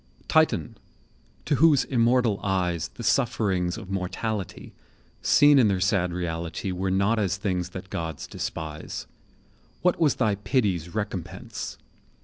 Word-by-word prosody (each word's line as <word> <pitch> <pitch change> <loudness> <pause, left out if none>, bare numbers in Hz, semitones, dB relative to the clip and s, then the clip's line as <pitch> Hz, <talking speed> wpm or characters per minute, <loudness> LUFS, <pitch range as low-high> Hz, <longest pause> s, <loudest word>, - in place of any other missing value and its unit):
Titan! - - +2 0.7
to 145 - +1
whose 150 0 +5
immortal 120 -3 +2
eyes 90 -4 0
The 120 - -10
sufferings 105 -7 +1
of 95 0 -8
mortality, 95 +2 -4 0.5
Seen 145 -1 +6
in 120 - +5
their 95 -2 +1
sad 90 -1 +1
reality, 85 +1 -3
Were 95 +1 -2
not 100 +4 +2
as 95 -3 0
things 90 -3 -2
that 95 0 -9
gods 80 -3 -4
despise; 80 -1 -5 0.8
What 180 -1 +3
was 155 -6 +3
thy 110 -5 +2
pity's 95 -4 -1
recompense? 105 -5 -5
95 Hz, 130 wpm, -26 LUFS, 90-115 Hz, 0.8 s, Seen